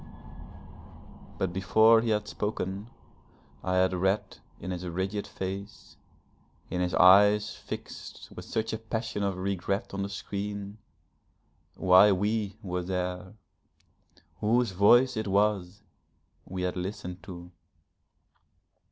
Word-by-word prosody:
But 95 -2 -1
before 110 +4 +5
he 115 - -2
had 105 -1 0
spoken 105 -1 -3 0.8
I 90 0 0
had 95 0 +3
read 95 +3 -1 0.2
in 95 - -5
his 90 0 -4
rigid 95 +4 -3
face, 95 +2 -7 0.8
in 90 - -1
his 90 0 0
eyes 105 +3 +6
fixed - - -9
with - - -8
such 110 0 -2
a 110 - -3
passion 110 -1 -4
of 100 -2 -1
regret 95 +2 -2
on 100 - -3
the 100 - -3
screen, 100 +1 -5 1.0
why 95 +2 +6
we 105 +1 -1
were 90 -2 -2
there 90 +1 -4 1.0
whose 115 +1 +2
voice 120 +7 +5
it 110 -1 -2
was 100 -1 0 0.6
we 90 0 -5
had 90 - -1
listened 90 -1 -5
to. 90 -2 -10
100 Hz, 115 wpm, -28 LUFS, 90-105 Hz, 1.0 s, eyes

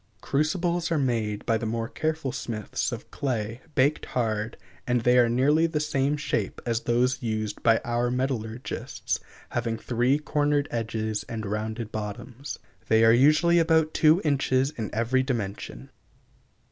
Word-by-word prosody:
Crucibles 170 +4 0
are 165 - +2
made 115 -6 -1
by 115 -1 +2
the 115 - -4
more 115 +1 -2
careful 155 0 -2
smiths 115 -4 -3
of - - -7
clay, 115 -3 -3
baked 145 +3 +2
hard, 110 -2 -1 0.3
and 125 -1 +2
they 125 +2 +4
are 120 -1 +5
nearly 145 +7 +3
the 160 -2 -1
same 145 -1 0
shape 115 -8 -2
as 115 -1 0
those 125 +3 +1
used 110 -3 -3
by 115 -1 +4
our 120 +1 0
metallurgists, 125 -2 -3 0.3
having 115 -1 -2
three 120 +4 +1
cornered 145 -1 +1
edges 110 -2 -2
and 110 -1 -4
rounded 110 +2 -3
bottoms. 110 +6 -6 0.3
They 110 0 +5
are 115 - +7
usually 155 +7 +5
about 160 -1 +3
two 155 +2 +5
inches 135 -2 +2
in 110 -7 -5
every 120 +4 +1
dimension. 115 -7 -4
120 Hz, 145 wpm, -26 LUFS, 115-145 Hz, 0.3 s, are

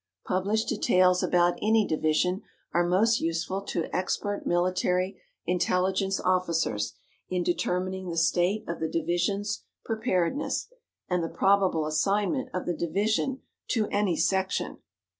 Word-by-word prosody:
Published 200 +4 0
details 185 -4 +3
about 175 0 +2
any 220 0 +3
division 160 +5 +1 0.3
are 175 - +3
most 220 +6 +3
useful 165 +4 -1
to 170 - -1
expert 205 +2 -2
military 180 +1 +1 0.2
intelligence 185 +2 +1
officers 170 - 0 0.3
in 180 -1 0
determining 185 +1 -1
the 170 - -4
state 180 +5 +1
of 170 - -4
the 160 - -1
division's 175 +6 -1 0.2
preparedness, 220 - -1 0.4
and 180 -2 0
the 165 - -2
probable 190 -5 +2
assignment 200 - 0
of 185 - -3
the 175 - 0
division 215 +10 -1 0.2
to 225 -3 +1
any 205 -4 +1
section. 190 +3 0
185 Hz, 120 wpm, -27 LUFS, 175-200 Hz, 0.4 s, details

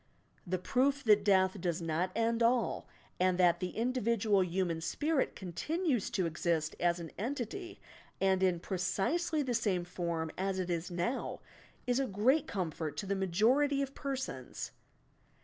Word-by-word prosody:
The 185 +1 0
proof 270 +9 +1
that 210 -3 +5
death 190 -1 +3
does 175 -1 -1
not 165 +2 -1
end 230 +1 +1
all 235 -1 +2 0.3
and 185 0 +3
that 175 -2 +4
the 180 -1 -4
individual 230 -4 +2
human 175 -2 -1
spirit 295 - 0
continues 250 - -1
to 185 - 0
exist 165 -1 -1
as 175 0 +2
an 165 -1 -7
entity 265 - -4 0.4
and 190 -1 +2
in 180 -2 +3
precisely 290 - 0
the 255 -2 -1
same 205 -6 +1
form 170 -2 -3
as 190 0 0
it 180 -1 -2
is 170 +1 -2
now, 180 +9 -2 0.5
is 250 +1 +1
a 270 - +1
great 245 +9 +2
comfort 160 -5 -3
to 205 - -3
the 200 +1 0
majority 240 +10 +2
of 275 0 -6
persons. 265 - -4
195 Hz, 150 wpm, -33 LUFS, 175-250 Hz, 0.5 s, that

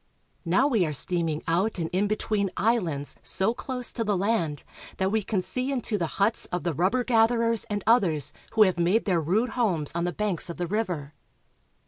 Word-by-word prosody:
Now 185 +11 +3
we 230 -9 +2
are 150 - -3
steaming 160 +3 0
out 185 +7 +1
and 165 -2 -2
in 195 +3 +1
between 210 -1 -1
islands 180 -11 0
so 190 - +2
close 250 0 -4
to 230 - -1
the 205 -3 0
land 180 -7 -1 0.3
that 190 0 0
we 220 0 +1
can 195 -1 -2
see 255 +9 -1
into 245 -5 -1
the 175 -5 -1
huts 210 +3 +1
of 180 - -3
the 170 -1 -1
rubber 190 - +1
gatherers 230 -1 +2
and 205 -3 -4
others 165 - +3 0.2
who 220 - +6
have 185 -4 +1
made 180 +7 +2
their 180 -4 +1
rude 205 +10 +1
homes 190 - 0
on 170 +1 -1
the 175 - -1
banks 200 -3 -2
of 170 - -6
the 175 - -2
river. 175 -7 -3
195 Hz, 195 wpm, -26 LUFS, 170-225 Hz, 0.3 s, who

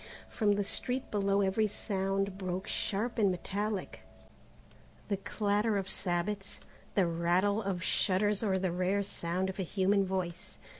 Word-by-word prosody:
From 210 -2 +2
the 205 0 +1
street 250 +6 -2
below 200 -1 +2
every 200 +3 +2
sound 195 -1 -1
broke 185 -1 -3
sharp 230 +4 -1
and 205 -3 +5
metallic 200 +3 -3 1.1
the 200 - +1
clatter 205 +2 +1
of 195 -1 -2
sabots, 190 +2 -2 0.4
the 195 - +4
rattle 175 +5 +2
of 190 -4 -2
shutters 205 +2 +2
or 195 -4 +2
the 185 -1 0
rare 185 +3 +1
sound 185 -1 -2
of 190 +1 -5
a - - +2
human 195 +2 +2
voice. 185 -2 -3
195 Hz, 145 wpm, -32 LUFS, 185-205 Hz, 1.1 s, and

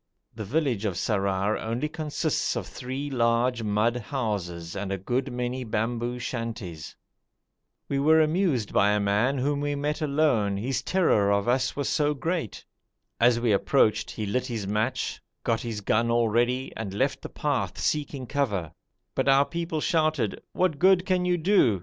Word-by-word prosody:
The 110 - -6
village 130 -3 0
of 100 -4 -1
Sarrar 100 +1 0
only 115 +6 -2
consists 155 -1 -1
of - - -3
three 135 +3 -5
large 120 0 +2
mud 110 +3 +1
houses 100 - -4
and 100 0 -3
a 95 - -1
good 125 +8 -2
many 125 +1 -3
bamboo 120 +2 -2
shanties. 115 -10 -5 0.9
We 140 - -1
were 160 +3 +5
amused 155 - +1
by 100 +1 +4
a 105 - +2
man 105 +7 +1
whom 140 +2 0
we 145 0 -1
met 150 +2 -2
alone, 140 -10 +2
his 125 +4 -1
terror 130 - +2
of 100 +1 +1
us 130 +1 +1
was 140 -1 -2
so 150 -1 +1
great. 160 - -3 0.5
As 120 0 +4
we 120 -2 +1
approached 105 +2 +2
he 110 - -4
lit 125 +5 -1
his 115 -5 -3
match, 110 +5 -1 0.2
got 115 -1 0
his 115 -3 -4
gun 115 +3 +1
all 115 -1 +2
ready, 120 +4 0
and 100 -3 -5
left - - 0
the - - -7
path - - -2
seeking 145 -3 -1
cover, 105 - -1 0.4
but - - +1
our 135 +1 +5
people 170 -1 -3
shouted: 155 - +1
'What 175 -6 0
good 185 0 +5
can 185 -2 +1
you 180 0 +2
do? 160 - +3
120 Hz, 170 wpm, -26 LUFS, 105-145 Hz, 0.9 s, were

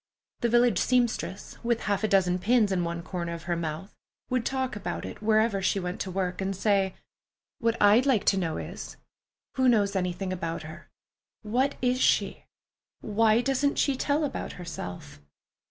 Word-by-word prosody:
The 235 - +1
village 240 +1 +4
seamstress, 240 -6 -1
with 235 -1 0
half 200 0 -1
a - - +3
dozen 185 -3 +2
pins 220 +1 +3
in 180 -2 +1
one 170 0 -3
corner 170 -2 -4
of 170 0 -7
her 175 0 -1
mouth, 165 +4 -5 0.4
would 255 -2 +1
talk 260 -3 -2
about 205 - -4
it - - -8
wherever 215 -1 +2
she 195 +1 +1
went 180 0 -4
to 190 - -3
work, 185 0 -2
and 195 0 -2
say, 195 -1 +1 0.6
"What 230 0 0
I'd 215 +6 +5
like 245 -7 +2
to - - -1
know 165 -3 -2
is, - - -7 0.6
who 260 -1 +4
knows 205 -4 +2
anything 185 0 -2
about 165 -3 -4
her? 155 +1 -11 0.5
What 250 +6 0
is 250 +1 +2
she? - - +1 0.6
Why 220 +2 +3
doesn't 275 +2 +1
she 280 - +2
tell 290 +3 0
about 290 - -3
herself?" 90 - -8
200 Hz, 170 wpm, -27 LUFS, 180-240 Hz, 0.6 s, I'd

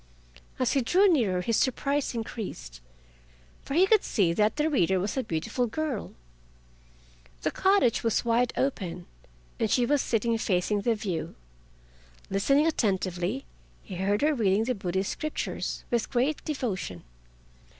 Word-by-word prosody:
As 255 -1 +1
he 275 - +2
drew 370 - +4
nearer 220 - +2
his 225 +4 0
surprise 275 +1 0
increased, 210 - -6 0.8
for 275 - -5
he 360 +3 +6
could 430 +1 +4
see 180 -6 +1
that 210 +4 +2
the 300 +1 +1
reader 190 - +2
was 195 +3 -2
a 265 - +1
beautiful 220 +6 -2
girl. 275 -1 -3 1.3
The - - +1
cottage 380 - +3
was 230 +1 +1
wide 235 +1 +2
open 185 -10 -2 0.5
and 220 - +1
she 245 +3 +3
was 285 +2 +2
sitting 230 0 0
facing 200 +1 0
the 230 +2 +1
view. 190 -6 -4 1.0
Listening 275 +10 +3
attentively, 195 - -1 0.4
he 185 - -7
heard 200 +6 0
her 305 +1 +4
reading 210 -5 +2
the 255 +2 0
Buddhist 190 -2 -2
scriptures 310 0 -4
with 235 -2 0
great 270 +4 0
devotion. 205 - -3
230 Hz, 140 wpm, -27 LUFS, 190-275 Hz, 1.3 s, he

